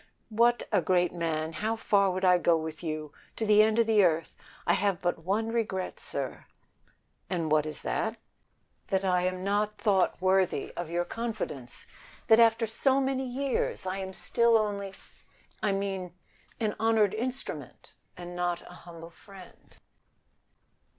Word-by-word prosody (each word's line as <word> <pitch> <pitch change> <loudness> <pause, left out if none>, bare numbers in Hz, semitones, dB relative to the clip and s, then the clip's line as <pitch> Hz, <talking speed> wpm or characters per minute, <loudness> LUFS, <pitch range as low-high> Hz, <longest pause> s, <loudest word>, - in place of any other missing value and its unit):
"What 235 +1 +3
a - - +3
great 180 -2 +2
man! 160 -2 -2
how 215 +7 -1
far 200 -3 +2
would 185 +1 -1
I 180 -1 +5
go 170 -1 +3
with 160 0 -6
you? 155 -2 -4 0.2
To 225 - -2
the 210 0 +6
end 220 +1 +3
of 230 - +4
the 220 -2 +4
earth. 165 -2 +1 0.3
I - - +3
have 200 -3 +1
but 175 -2 -1
one 210 +5 0
regret, 215 -5 -2
sir." - - -5 0.8
"And 165 -4 -2
what 155 0 +3
is 155 - -7
that?" 225 +1 -1 0.7
"That 195 -1 0
I 180 -1 +2
am 185 0 -3
not 210 +2 0
thought 205 -3 +2
worthy 185 -4 +1
of 175 -2 -5
your 175 +1 -1
confidence. 220 - -5 0.4
That 220 0 +7
after 230 0 +5
so 265 +5 +1
many 265 -1 -1
years 260 -4 -2
I 190 +1 -2
am 190 0 -5
still 235 +4 +2
only 205 -2 -1
a 195 - -11
too - - -17 0.6
I 210 - +1
mean 195 -3 -3 0.4
an 215 -3 -1
honored 220 -2 +3
instrument, 255 +4 -5 0.2
and 175 0 -8
not 175 -1 -1
a - - -13
humble 165 0 -10
friend." 190 +1 -16
195 Hz, 165 wpm, -29 LUFS, 175-220 Hz, 0.8 s, That